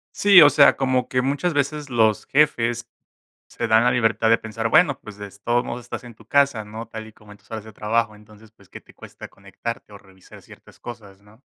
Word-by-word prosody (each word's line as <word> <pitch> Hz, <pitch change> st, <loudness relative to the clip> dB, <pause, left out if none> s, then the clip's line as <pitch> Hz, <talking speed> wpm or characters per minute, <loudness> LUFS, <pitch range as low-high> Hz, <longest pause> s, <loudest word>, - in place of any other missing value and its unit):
Sí, 200 Hz, -3 st, +7 dB
o 145 Hz, -, +8 dB
sea, 140 Hz, 0 st, +5 dB
como 130 Hz, -2 st, 0 dB
que 130 Hz, -, 0 dB
muchas 145 Hz, +6 st, -1 dB
veces 145 Hz, 0 st, -2 dB
los 110 Hz, -4 st, +1 dB
jefes 120 Hz, -5 st, +1 dB, 0.6 s
se -, -, -5 dB
dan 110 Hz, +1 st, +4 dB
la 125 Hz, -, +3 dB
libertad 115 Hz, -2 st, +1 dB
de 115 Hz, -, +5 dB
pensar, 115 Hz, +1 st, -4 dB
bueno, 140 Hz, 0 st, +3 dB
pues, 105 Hz, -1 st, -12 dB
des 100 Hz, 0 st, -11 dB
todos 120 Hz, +3 st, 0 dB
modos 125 Hz, -, -6 dB
estás -, -, -7 dB
en 120 Hz, -2 st, -13 dB
tu -, -, -20 dB
casa, 140 Hz, -6 st, +1 dB
¿no? 110 Hz, +2 st, -9 dB
Tal 110 Hz, -1 st, -9 dB
y 110 Hz, -, -16 dB
como 105 Hz, -1 st, -18 dB
en 105 Hz, -, -14 dB
tus 100 Hz, -, -30 dB
horas 110 Hz, -2 st, -6 dB
de 110 Hz, -, -13 dB
trabajo, 110 Hz, +1 st, -1 dB
entonces, 105 Hz, +1 st, -19 dB
pues, 100 Hz, -4 st, -24 dB
¿qué -, -, -12 dB
te -, -, -21 dB
cuesta -, -, -12 dB
conectarte 100 Hz, +2 st, -8 dB
o -, -, -10 dB
revisar 95 Hz, -2 st, -18 dB
ciertas -, -, -18 dB
cosas, 105 Hz, -5 st, -11 dB
no? 105 Hz, +3 st, -22 dB
115 Hz, 230 wpm, -22 LUFS, 105-130 Hz, 0.6 s, o